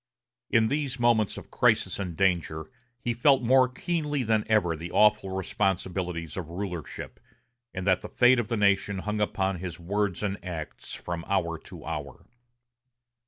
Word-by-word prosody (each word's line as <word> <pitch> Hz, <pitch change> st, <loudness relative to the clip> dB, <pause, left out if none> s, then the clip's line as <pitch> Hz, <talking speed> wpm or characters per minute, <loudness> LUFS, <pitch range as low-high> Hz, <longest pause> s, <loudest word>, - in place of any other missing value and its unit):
In 115 Hz, -1 st, +4 dB
these 140 Hz, 0 st, -1 dB
moments 115 Hz, -4 st, +3 dB
of -, -, -10 dB
crisis -, -, +2 dB
and 90 Hz, -5 st, -4 dB
danger 85 Hz, -5 st, 0 dB, 0.3 s
he 120 Hz, 0 st, -1 dB
felt 130 Hz, +2 st, +4 dB
more 130 Hz, +1 st, +5 dB
keenly 150 Hz, 0 st, -1 dB
than 110 Hz, -1 st, +2 dB
ever 100 Hz, -7 st, +2 dB
the 85 Hz, +3 st, -7 dB
awful 105 Hz, -2 st, +4 dB
responsibilities 90 Hz, -2 st, -2 dB
of 90 Hz, -4 st, -5 dB
rulership, 90 Hz, -3 st, -6 dB, 0.5 s
and 95 Hz, 0 st, -5 dB
that 95 Hz, -2 st, +3 dB
the -, -, -7 dB
fate 125 Hz, 0 st, +5 dB
of 115 Hz, -, -1 dB
the 115 Hz, 0 st, -1 dB
nation 100 Hz, -1 st, +2 dB
hung 105 Hz, 0 st, -1 dB
upon 95 Hz, -3 st, 0 dB
his 90 Hz, -2 st, -6 dB
words 100 Hz, +2 st, -1 dB
and 100 Hz, -3 st, -2 dB
acts 85 Hz, -4 st, -6 dB
from 85 Hz, -1 st, -5 dB
hour 85 Hz, -4 st, 0 dB
to -, -, -12 dB
hour. 75 Hz, -3 st, -6 dB
95 Hz, 160 wpm, -27 LUFS, 85-115 Hz, 0.5 s, more